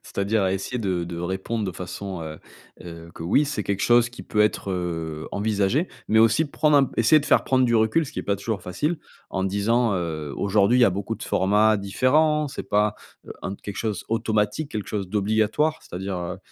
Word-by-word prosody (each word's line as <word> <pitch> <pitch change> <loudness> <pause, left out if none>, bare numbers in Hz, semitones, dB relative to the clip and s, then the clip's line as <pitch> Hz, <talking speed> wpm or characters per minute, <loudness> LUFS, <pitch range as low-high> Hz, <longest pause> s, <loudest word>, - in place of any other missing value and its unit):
c'est-à-dire 100 0 0
essayer 95 +7 -2
de 95 -5 -1
de 85 0 -6
répondre 95 +5 -3
de 95 - -3
façon, 90 +1 -6
heu 80 0 -7 0.5
heu, 85 -1 -10
que: - - -8
«Oui, 140 - +3
c'est 145 +1 -3
quelque 100 -1 -2
chose 120 0 +4
qui 125 - -11
peut 105 - -1
être, 105 -2 0
heu, 80 -3 -3
envisagé». 105 - 0 0.2
Mais 110 +1 +4
aussi 115 +8 +4
prendre 150 0 +2
un 140 - +6
p - - -9
essayer 155 +7 +6
de 145 - -5
faire - - +4
prendre 130 -1 +2
du 120 -1 +2
recul, 110 +8 +2
ce - - -10
qui - - -3
est - - -9
pas 100 -1 0
toujours 100 -1 -4
facile. 150 - -2 0.3
En 95 - -2
disant, 105 +4 +1
heu: 80 -4 -4
«Aujourd'hui, 100 +4 +3
il - - +5
y - - +9
a 100 - +4
beaucoup 100 +4 -3
de - - -10
formats 105 +3 +3
différents, 150 +10 +2
c'est 140 - -6
pas, 105 0 +2 0.3
heu, - - -7
en 95 +1 -4
quelque 100 - -8
chose 105 -5 -3
automatique, 110 +5 0
quelque 105 -2 -4
chose 100 -3 -3
d'obligatoire. 110 +9 +1
C'est-à-dire, 95 +1 -5
heu 90 -1 -5
105 Hz, 215 wpm, -24 LUFS, 95-120 Hz, 0.5 s, y